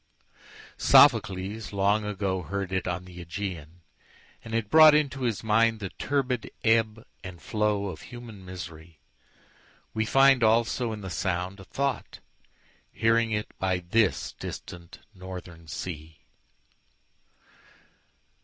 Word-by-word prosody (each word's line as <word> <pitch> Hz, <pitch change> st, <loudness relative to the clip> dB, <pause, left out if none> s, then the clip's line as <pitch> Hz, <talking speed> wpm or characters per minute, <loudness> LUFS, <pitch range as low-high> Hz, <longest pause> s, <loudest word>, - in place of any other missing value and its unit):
Sophocles 110 Hz, -5 st, +4 dB
long 100 Hz, +1 st, +2 dB
agoHeard 95 Hz, -1 st, -3 dB
it 95 Hz, -1 st, -1 dB
on 90 Hz, +1 st, -3 dB
the 90 Hz, -1 st, -10 dB
Ægæan, 85 Hz, -2 st, -6 dB, 0.6 s
and 115 Hz, -, -5 dB
it 115 Hz, -2 st, -1 dB
broughtInto 150 Hz, -3 st, +6 dB
his 115 Hz, -3 st, -3 dB
mind 110 Hz, +1 st, +3 dB
the 100 Hz, -3 st, -5 dB
turbid 130 Hz, -2 st, -2 dB
ebb 110 Hz, 0 st, +2 dB, 0.2 s
and 90 Hz, -2 st, -9 dB
flowOf 105 Hz, -2 st, -1 dB
human 120 Hz, -5 st, -11 dB
misery; 85 Hz, -3 st, -9 dB, 1.0 s
weFind 135 Hz, +4 st, +4 dB
also 115 Hz, +1 st, +2 dB
in 105 Hz, -1 st, -6 dB
the 95 Hz, -2 st, -6 dB
sound 90 Hz, +1 st, -2 dB
a -, -, -10 dB
thought, 140 Hz, +5 st, -3 dB, 0.7 s
Hearing 115 Hz, +1 st, +2 dB
it 105 Hz, -1 st, -3 dB
by 95 Hz, -1 st, +1 dB
this 95 Hz, +4 st, 0 dB
distant 85 Hz, -1 st, -9 dB, 0.2 s
northern 90 Hz, -3 st, -10 dB
sea. 80 Hz, 0 st, -7 dB
100 Hz, 105 wpm, -27 LUFS, 90-115 Hz, 1.0 s, broughtInto